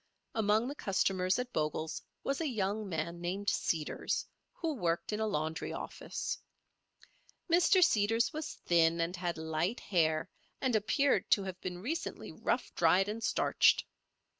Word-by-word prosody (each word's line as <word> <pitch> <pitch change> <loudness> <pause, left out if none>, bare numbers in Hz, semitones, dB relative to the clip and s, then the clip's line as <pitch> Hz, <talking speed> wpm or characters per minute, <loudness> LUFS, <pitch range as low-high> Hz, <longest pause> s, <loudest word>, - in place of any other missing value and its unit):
Among 220 +2 +2
the 280 - -3
customers 190 -6 +1
at 250 0 -4
Bogle's 155 +1 -2 0.2
was 275 +3 -1
a 320 - 0
young 210 -3 -1
man 170 +1 -3
named 190 +4 -1
Seeders, 155 -3 -1 0.3
who 325 -2 -2
worked 175 - -1
in 210 - -1
a 220 - +1
laundry 160 -4 -2
office. - - -4 1.1
Mr. 360 +2 +5
Seeders 225 +2 +3
was 310 0 -4
thin 170 -1 +4
and 165 +2 0
had 175 -2 -2
light 160 +7 -1
hair, 160 -4 +1 0.3
and 255 -3 +1
appeared 265 +7 +2
to 200 - +4
have 190 -1 -6
been 180 0 -5
recently 320 +8 -4
rough - - -1
dried 195 +2 +4
and 225 +2 -4
starched. - - +3
195 Hz, 145 wpm, -32 LUFS, 170-230 Hz, 1.1 s, Mr